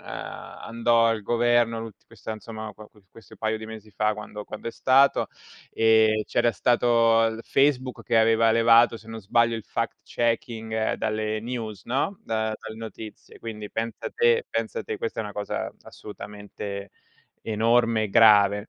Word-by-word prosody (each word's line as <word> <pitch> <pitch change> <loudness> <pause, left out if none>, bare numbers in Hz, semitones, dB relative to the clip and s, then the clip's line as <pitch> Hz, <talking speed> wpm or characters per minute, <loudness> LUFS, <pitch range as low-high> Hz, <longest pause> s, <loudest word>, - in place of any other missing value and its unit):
andò 115 0 -1
al 115 -2 0
governo 120 +1 +2
l'ult 115 -2 -10
questa, 110 - -7
insomma, 110 0 -8
qua 105 +1 -14
qua 105 - -23
questo 110 -5 -16
paio 110 0 -1
di 110 - -8
mesi 110 -1 -10
fa 105 +2 +1
quando 105 0 -8
quando 110 +2 -7
è - - -4
stato, 135 +1 +3 0.4
ehm, 110 -1 +4
c'era 120 0 +1
stato 115 0 +3
l 110 0 -6
Facebook 135 -2 +1
che 115 - 0
aveva 115 0 +4
levato 115 +1 +5
se 110 - -16
non 115 0 -7
sbaglio 115 +3 +2
il 110 -2 -6
fact - - -3
checking 115 -2 -1
dalle 110 0 -2
news, 110 -4 -6
no? 140 +10 -1
Da 110 -1 -1
dalle 110 - -9
notizie 110 -1 -10
quindi 105 -2 -7
pensa 115 0 -4
te 470 0 +2
pensa 470 - -3
te 445 -2 -5
questa 460 -1 -3
è - - -2
una 105 - -7
cosa 105 0 -4
assolutamente 100 -1 -8 0.5
enorme 115 0 +2
e - - -3
grave, 105 -2 +5
115 Hz, 160 wpm, -25 LUFS, 110-115 Hz, 0.5 s, levato